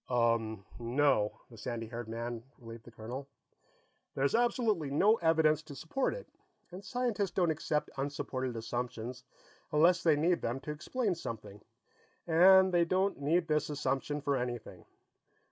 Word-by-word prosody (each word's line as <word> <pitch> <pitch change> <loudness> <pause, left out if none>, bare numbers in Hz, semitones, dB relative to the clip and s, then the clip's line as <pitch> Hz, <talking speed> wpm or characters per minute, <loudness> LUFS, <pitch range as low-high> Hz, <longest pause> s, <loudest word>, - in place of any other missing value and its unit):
"Umm, 115 -4 +1
no," 120 -3 +1
the 115 - -12
sandy 115 0 -4
haired 115 0 -6
man 115 +1 -4 0.2
relieved 115 -2 -11
the 120 - -12
colonel. 120 +5 -7 0.9
"There's 135 +1 +1
absolutely 230 - +1
no 200 +11 +4
evidence 160 -3 +3
to 155 -2 -11
support 255 - -1
it, - - -9 0.4
and 185 +3 -9
scientists 235 -6 -1
don't 175 -3 +1
accept 150 -1 -1
unsupported 130 -2 -3
assumptions 120 +2 -4 0.5
unless 170 +4 +4
they 160 -3 +4
need 170 +4 +2
them 120 +3 -2
to 150 - -5
explain 205 +8 -1
something, 105 - -7 0.6
and 185 +3 +6
they 175 -1 +5
don't 185 +2 0
need 165 +4 +2
this 150 -1 +1
assumption 145 0 -2
for 140 0 0
anything. 125 -3 -5
145 Hz, 145 wpm, -32 LUFS, 120-175 Hz, 0.9 s, and